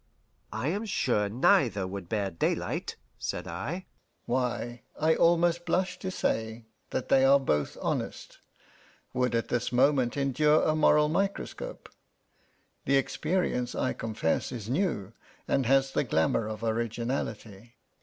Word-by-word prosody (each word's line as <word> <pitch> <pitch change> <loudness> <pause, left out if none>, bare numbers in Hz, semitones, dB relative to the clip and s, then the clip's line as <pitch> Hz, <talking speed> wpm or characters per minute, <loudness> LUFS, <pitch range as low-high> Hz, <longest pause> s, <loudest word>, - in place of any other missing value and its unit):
"I 110 +7 -2
am 205 +6 -2
sure 120 - +1
neither 110 -3 +3
would 95 -2 -6
bear 100 -3 -1
daylight," 85 - -2 0.2
said - - -4
I. 165 - -4 0.4
"Why, 120 -1 -2 0.2
I 160 +1 +4
almost 170 +1 +3
blush 180 +1 0
to 190 - -4
say 110 -9 -2 0.2
that 130 - -3
they 135 -1 +5
are 135 +1 +6
both 75 - -1
honest - - -3 0.7
would 125 -1 +1
at 115 - -1
this 120 - -1
moment 130 0 +3
endure 150 +3 +3
a 155 - +2
moral 150 -1 +4
microscope. 200 - -3 1.0
The 140 - +4
experience, 135 -3 -1
I 130 - 0
confess, 110 -6 -1
is 115 -3 -5
new, 130 - -1 0.3
and 135 -4 +1
has 135 +1 +3
the - - +1
glamour 105 - +1
of 110 +1 -6
originality." 115 -1 -3
125 Hz, 135 wpm, -29 LUFS, 110-155 Hz, 1.0 s, are